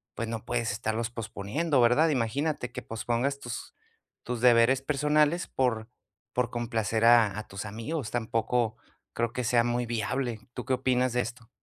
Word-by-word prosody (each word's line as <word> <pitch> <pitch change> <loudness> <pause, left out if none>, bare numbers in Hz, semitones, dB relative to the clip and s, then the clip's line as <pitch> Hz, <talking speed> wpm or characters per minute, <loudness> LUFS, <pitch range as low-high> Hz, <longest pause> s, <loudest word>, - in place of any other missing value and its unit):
pues, 115 - -3
no 115 -1 -5
puedes 120 -3 -1
estarlos 110 +2 -2
posponiendo, 120 +6 -1
¿verdad? 125 +7 +5
Imagínate 135 0 -1
que - - -6
pospongas 120 +5 -2
tus 120 -3 -7 0.5
tus 120 -1 -3
deberes 125 +1 +5
personales 150 +4 +2
por 115 -3 -1 0.4
por 125 -2 +1
complacer 115 -2 -1
a 115 -4 +6
a 110 - -8
tus 95 +2 -6
amigos, 115 +5 -4
tampoco 115 0 0 0.4
creo 115 0 -1
que 125 - -2
sea 120 0 +3
muy 120 0 0
viable. 120 +1 -2
¿Tú - - -5
qué 130 - -3
opinas 130 0 +1
de 125 - +1
esto? 115 0 -7
120 Hz, 160 wpm, -28 LUFS, 115-130 Hz, 0.5 s, a